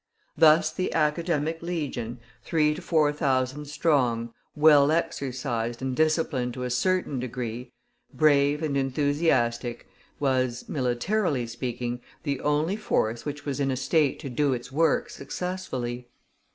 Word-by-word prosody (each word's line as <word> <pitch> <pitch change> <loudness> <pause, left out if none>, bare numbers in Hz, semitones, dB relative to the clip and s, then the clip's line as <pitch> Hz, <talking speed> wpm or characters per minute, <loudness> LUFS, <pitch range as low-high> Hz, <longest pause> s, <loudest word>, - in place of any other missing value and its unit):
Thus 155 0 +5
the 185 - -2
Academic 160 0 0
Legion, 140 -9 -4 0.2
three 150 -2 +2
to 165 - -7
four 155 -4 +2
thousand 135 0 0
strong, 125 -6 +1 0.2
well 150 -2 +6
exercised 125 -7 -2
and 130 -1 -2
disciplined 155 -6 +1
to 125 - -4
a 125 - -3
certain 180 0 0
degree, 125 -1 -5 0.4
brave 145 0 +3
and 145 -3 -1
enthusiastic, 135 -4 0 0.3
was, 130 -3 0
militarily 135 - 0
speaking, 120 +1 -4 0.2
the 140 -3 -2
only 150 +7 +1
force 115 - -1
which 145 0 -5
was 140 -1 -3
in 140 -1 +1
a 130 - -1
state 140 +2 +2
to 140 - -5
do 140 +2 +1
its 120 +1 -6
work 165 - +2
successfully. 130 - -4
140 Hz, 130 wpm, -26 LUFS, 125-155 Hz, 0.4 s, well